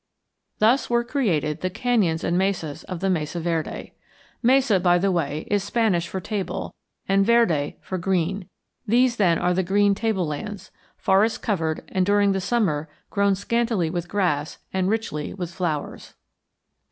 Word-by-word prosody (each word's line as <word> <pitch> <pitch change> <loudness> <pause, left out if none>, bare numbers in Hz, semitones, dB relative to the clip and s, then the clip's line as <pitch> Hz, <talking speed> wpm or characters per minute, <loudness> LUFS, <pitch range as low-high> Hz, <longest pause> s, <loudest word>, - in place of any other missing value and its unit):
Thus 230 +6 +3
were 240 0 +2
created 180 - -1
the 185 - 0
canyons 205 -6 +1
and 170 - 0
mesas 180 -6 -1
of 180 -3 -6
the 195 - +1
Mesa 160 -1 -2
Verde. 165 -1 -3 0.5
Mesa, 255 -5 +4
by 175 -1 +4
the 195 +2 +1
way, 155 -3 -1
is 205 -2 0
Spanish 200 -5 +1
for 190 - -4
table, 195 +1 -4 0.3
and 195 0 +3
verde 195 -11 +2
for 185 - -4
green. 185 +1 -1 0.4
These, 240 +2 +3
then, 175 -5 +3
are 180 +1 +1
the 185 - +1
green 200 +2 +3
tablelands, 195 -2 -3 0.3
forest 200 +4 +2
covered 160 -8 -1
and 185 - +1
during 205 +1 +3
the 195 0 -1
summer 180 -9 0 0.2
grown 200 -1 +2
scantily 225 -5 0
with 175 -1 -3
grass 170 -7 0 0.2
and 190 0 +1
richly 200 -10 -2
with 175 -3 -5
flowers. 165 -5 -4
190 Hz, 155 wpm, -24 LUFS, 170-210 Hz, 0.5 s, Mesa